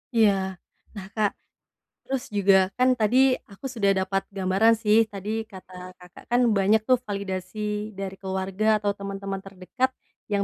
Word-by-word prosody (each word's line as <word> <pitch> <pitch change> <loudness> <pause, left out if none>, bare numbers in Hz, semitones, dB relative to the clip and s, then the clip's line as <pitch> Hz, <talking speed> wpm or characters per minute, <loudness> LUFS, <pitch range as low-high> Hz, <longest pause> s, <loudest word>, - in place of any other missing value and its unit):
Iya. 220 -3 +6 0.6
Nah, 195 - -7
Kak, 215 -2 +2 0.7
terus 270 -1 -3
juga, 195 -1 +5 0.2
kan 255 +1 +4
tadi 215 +4 +2 0.3
aku 200 +7 -12
sudah 200 -4 +2
dapat 195 +1 0 0.2
gambaran 195 +5 +4
sih, 210 +1 +4
tadi 200 +1 -6 0.2
kata 185 -1 -12 0.3
Kakak 180 0 -15
kan 245 +1 +4 0.2
banyak 205 +3 +3
tuh 255 - +6
validasi 190 -1 -4 0.4
dari 195 -1 -4
keluarga 190 +2 -3 0.2
atau 205 - 0
temen-temen 195 0 -5
terdekat, 195 +7 -2 0.4
yang 200 -1 +2
200 Hz, 145 wpm, -25 LUFS, 190-215 Hz, 0.7 s, Iya